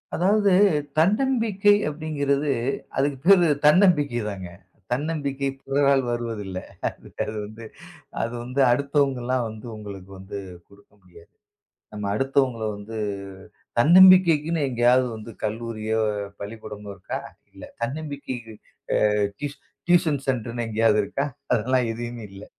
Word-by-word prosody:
அதாவது, 200 +3 +3 0.5
தன்னம்பிக்கை 210 +2 +3 0.2
அப்படிங்கறது, 145 -2 -1 0.5
அதுக்குப் 135 -1 0
பேரு 185 -3 +7 0.2
தன்னம்பிக்கைதாங்க. 145 - +3 0.4
தன்னம்பிக்கை 140 0 -2
பிறரால் 140 -1 +2
வருவதில்ல. 110 -6 -4 0.6
அது - - -4
வந்து, 110 +2 -11 0.6
அது 115 - -2
வந்து 125 +3 -2
அடுத்தவங்க 140 0 +1
எல்லாம் 125 0 0
வந்து 110 +1 -10
உங்களுக்கு 100 -3 -9
வந்து 95 +1 -7 0.3
கொடுக்க 100 0 -21
முடியாது. 85 -2 -18 0.6
நம்ம 105 -1 -5
அடுத்தவங்களை 130 -3 0
வந்து 105 +2 -8 0.8
தன்னம்பிக்கைக்குன்னு 170 0 +6
எங்காவது 125 +1 +3
வந்து 110 +1 -9
கல்லூரியோ, 110 0 -2 0.4
பள்ளிக்கூடமோ 105 0 -8
இருக்கா? 95 - -5 0.3
இல்ல. - - -13 0.2
தன்னம்பிக்கைக்கு 130 -3 -5 0.5
அ - - +1 0.3
டியூஷன் 145 -1 -6 0.3
டியூஷன் 165 -5 +3
சென்டர்ன்னு 120 -2 -2
எங்காவது 110 -1 +3
இருக்கா? 135 +7 -2 0.3
அதெல்லாம் 125 +2 +1
எதையுமே 120 0 -6
இல்ல. 100 +1 -10
130 Hz, 105 wpm, -24 LUFS, 110-150 Hz, 0.8 s, பேரு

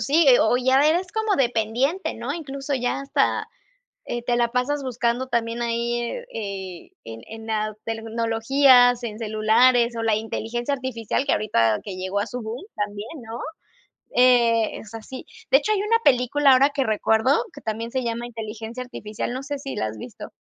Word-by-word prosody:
sí, 290 +7 +3
eh, 250 - +7
o 235 +3 +3
ya 260 +3 +4
eres 355 +4 +1
como 440 -2 0
dependiente, 245 - 0
¿no?, 240 +6 -4
incluso, 275 -3 -4
ya 245 +1 -1
hasta, 275 0 0 0.6
eh, 240 0 -4
te 240 0 0
la 240 -1 +3
pasas 250 +4 -1
buscando 245 0 -1
también 235 -1 -1
ahí, 235 0 -1
eh 485 - -5
eh, 190 -4 -6
en 115 0 -9
en 225 0 -9
la 215 -1 -1
tecnologías, 235 +3 +3
en 220 -2 -5
celulares, 235 +2 +3
o 230 - -3
la 225 -2 +2
inteligencia 230 +4 -3
artificial 255 -1 -2
que - - +3
ahorita 115 - +2
que 195 - -6
llegó 185 +2 -2
a 205 - -1
su 250 -1 -6
boom 225 +4 -6
también, 205 0 -4 0.2
¿no?, 225 +2 -7 0.8
eh, 235 -3 +4
es 220 +1 -11
así. 240 +4 -9 0.2
De - - +7
hecho, 430 - -2
hay 410 -1 +1
una 455 +2 +2
película 270 +2 +4
ahora 275 +3 +5
que 275 -2 0
recuerdo, 220 - +2
que 285 - -11
también 225 +1 -4
se 260 - -1
llama 235 0 -3
Inteligencia 225 +1 -7
Artificial, 225 -3 -5
no 260 +2 -5
sé 285 0 -4
si 270 -1 -6
la 110 - -1
has 110 0 -6
visto. - - -9
240 Hz, 180 wpm, -23 LUFS, 220-270 Hz, 0.8 s, eh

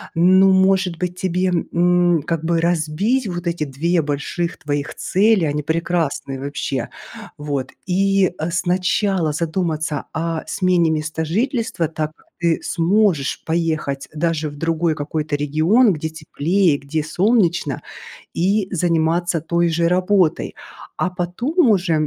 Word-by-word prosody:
ну 185 +3 +5
может 190 -2 +3
быть 180 0 -4
тебе, 185 0 0 0.2
м, 175 -2 +3
как 165 -2 -2
бы 165 0 +1
разбить 175 +9 0
вот 175 -1 -5
эти 170 -2 -1
2 160 +5 0
больших 150 +4 -3
твоих 145 -1 -3
цели? 200 -2 +2
Они 150 0 -1
прекрасные, 160 -4 -2
вообще! 140 -2 -3 0.5
Вот. 145 -3 -3
И, 195 0 +2
э, 165 +2 -2
сначала 180 -1 +1
задуматься 160 -2 -2
о 165 0 -2
смене 180 -3 +2
места 155 +1 -2
жительства, 225 - -1
так 155 0 -4
как - - -27
ты 170 -2 +1
сможешь 175 -4 +1
поехать 160 -4 -1
даже 160 -1 -1
в 145 - -11
другой 165 0 0
какой-то 150 0 -3
регион, 160 - +3
где 160 +1 -4
теплее, 160 +1 0
где 150 +2 -3
солнечно, 175 - +1 0.5
и 195 +3 +1
заниматься 170 0 +1
той 170 +1 +1
же 170 +1 +1
работой. 185 -1 +1 0.4
А 185 - 0
потом 235 - 0
уже, 185 -5 +2
170 Hz, 130 wpm, -20 LUFS, 155-185 Hz, 0.5 s, ну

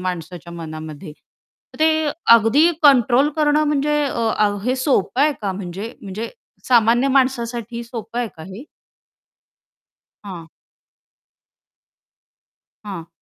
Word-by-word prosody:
माणसाच्या 175 -1 -6
मनामध्ये. 155 -1 -8 0.6
तर - - -15
ते 315 -1 +2 0.3
अगदी 230 +10 +4
कंट्रोल 265 0 +5
करणं 300 0 +2
म्हणजे 295 0 +1
अ, 220 -5 0
हे 255 +2 0
सोपं 260 -1 0
आहे 300 0 +3
का 195 -2 -2
म्हणजे 195 +3 -6
म्हणजे 205 +3 -6 0.4
सामान्य 240 +1 +4
माणसासाठी 240 -3 -1
सोपं 230 0 -6
आहे 240 - -1
का 160 - -9
हे? 195 - -10 1.6
हां. 170 -4 -9 2.4
हां. 175 -5 -7
230 Hz, 105 wpm, -20 LUFS, 190-270 Hz, 2.4 s, कंट्रोल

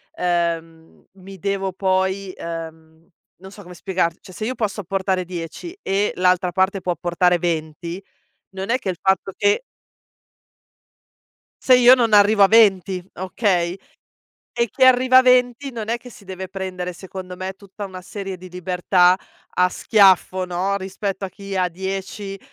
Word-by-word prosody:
ehm, 165 -2 -3
mi 195 0 -12
devo 195 0 -2
poi 190 0 -1
ehm, 160 -1 -8 0.3
non 190 +2 -13
so 205 - -12
come 180 0 -12
spiegar 180 -3 -1
cioè, 185 - -14
se 215 - -5
io 255 +2 -2
posso 210 -2 -2
apportare 190 0 -1
10 180 - -7
e, 195 +2 0
l'altra 180 0 +2
parte 190 +2 +1
può 180 - -1
apportare 175 +1 +1
20, 170 +2 -3 0.5
non 190 +3 -5
è 250 - +3
che - - -8
il 175 - -3
fatto 190 0 +1
che 205 - +2 2.0
se 255 - +6
io 250 +1 +8
non 230 -4 +1
arrivo 205 0 +6
a - - +7
20, 195 -4 +4
okay? 185 -1 0 0.8
E 235 -2 +1
chi 260 - +1
arriva 255 0 +6
a - - +9
20, 250 +1 +2
non 225 -2 -6
è 235 - 0
che 250 +1 -13
si 205 - -15
deve 190 0 -7
prendere, 185 -1 -5
secondo 185 0 -9
me, 185 +1 -5
tutta 200 +1 -11
una 185 -1 -9
serie 195 0 -7
di 185 +1 -12
libertà 180 0 +2 0.3
a 180 0 +2
schiaffo, 190 -3 +3
no, 185 +3 -1
rispetto 195 +1 -4
a - - -7
chi 195 0 -7
ha 180 -1 +2
10, 195 +2 -5
190 Hz, 160 wpm, -21 LUFS, 180-200 Hz, 2.0 s, a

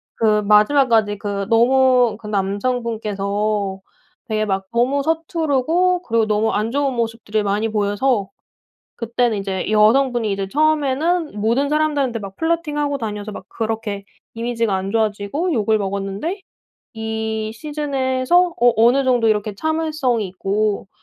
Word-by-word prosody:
그 215 -2 +2
마지막까지 210 0 +3
그 200 -1 -3
너무 250 -1 +4
그 225 - -14
남성분께서 205 -1 -2 0.5
되게 215 -1 0
막 195 -1 -2
너무 260 +4 +1
서투르고 325 +2 +1
그리고 230 -8 +1
너무 215 +1 +1
안 215 +2 -1
좋은 275 -1 0
모습들을 225 -2 -2
많이 205 +2 0
보여서 205 +1 0 0.7
그때는 235 -1 -1
이제 195 -1 -3
여성분이 230 +1 +3
이제 195 0 -2
처음에는 305 - 0
모든 235 +7 +1
사람들한테 290 -6 0
막 195 -1 -9
플러팅하고 300 -3 -1
다녀서 210 -3 -5
막 190 - -9
그렇게 220 -3 -4 0.3
이미지가 230 -2 -1
안 190 +1 -2
좋아지고 220 - -1
욕을 220 -4 +2
먹었는데 200 - -3 0.5
이 220 -1 -3
시즌에서 290 +4 0
어 240 0 +5
'어느 240 +5 +4
정도 245 -3 +3
이렇게 210 -1 0
참을성이 305 -5 -1
있고 200 +2 -2
225 Hz, 315 characters per minute, -20 LUFS, 210-275 Hz, 0.7 s, 어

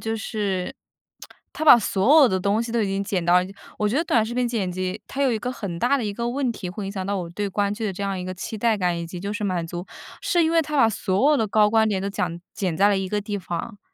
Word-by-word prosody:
就 225 0 -2
是 205 -4 -3 0.8
它 315 - -4
把 245 - +9
所 235 +9 +4
有 260 - +6
的 185 -1 0
东 200 +3 +1
西 230 0 -5
都 235 - +1
已 - - 0
经 195 0 -2
剪 185 -3 -1
到 175 +1 +4
了 180 - -3 0.3
我 210 - +1
觉 215 - -2
得 320 - +3
短 230 -10 +2
视 235 - -5
频 250 -1 +1
剪 205 -6 -2
辑， 185 +3 -3
它 280 - -3
有 270 - +3
一 225 - 0
个 250 +4 -3
很 185 -8 -5
大 265 +7 +2
的 245 - -2
一 205 - -2
个 235 +2 -2
问 260 0 -1
题 195 -5 -6
会 195 +3 -6
影 - - -4
响 190 -2 -4
到 200 - -1
我 175 -2 -5
对 205 +3 -3
观 200 +1 0
剧 220 +2 -4
的 200 - -1
这 195 - -6
样 195 -1 -2
一 180 - -5
个 185 - -4
期 190 +4 -6
待 225 -1 +2
感 180 -3 0
以 170 - -4
及 175 +1 -8
就 200 +2 -3
是 210 -1 -3
满 180 -3 -1
足， 175 +2 -6 0.4
是 365 -4 +2
因 320 - +2
为 330 0 +4
它 300 -1 -4
把 230 - +6
所 215 +5 +1
有 300 - +4
的 225 - +1
高 210 0 +4
光 220 0 +4
点 200 -3 0
都 200 - -2
讲 170 -3 -3
剪 185 -5 -1
在 200 +1 +5
了 205 - +2
一 190 - -2
个 210 +1 -1
地 205 0 -4
方。 190 +4 -5
205 Hz, 325 characters per minute, -23 LUFS, 185-235 Hz, 0.8 s, 把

